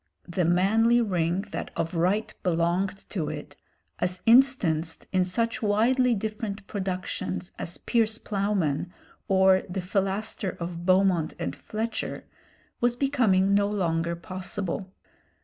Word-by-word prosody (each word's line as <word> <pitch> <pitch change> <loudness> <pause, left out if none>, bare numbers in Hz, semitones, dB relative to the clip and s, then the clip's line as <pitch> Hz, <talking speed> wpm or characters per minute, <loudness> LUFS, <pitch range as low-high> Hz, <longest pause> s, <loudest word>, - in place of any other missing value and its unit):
The 175 0 0
manly 220 +7 +4
ring 180 -5 +1
that - - -4
of 165 0 -2
right 185 +6 +1
belonged 180 +2 0
to 165 -8 -2
it, - - -7 0.4
as 180 0 -1
instanced 215 - +3
in 185 -1 +3
such 230 +6 -1
widely 235 +4 +3
different 215 -1 -4
productions 185 -2 -3
as 170 - -3
'Piers 225 -2 +1
Ploughman,' 195 -7 -1 0.4
or 190 -1 +5
the 185 +2 -3
'Philaster' 195 +1 -2
of 170 0 -5
Beaumont 185 -4 +3
and - - -3
Fletcher, 220 +1 -4 0.6
was 240 0 +2
becoming 230 -8 +2
no 200 0 +4
longer 170 -4 0
possible. 185 +2 -4
190 Hz, 120 wpm, -27 LUFS, 180-215 Hz, 0.6 s, or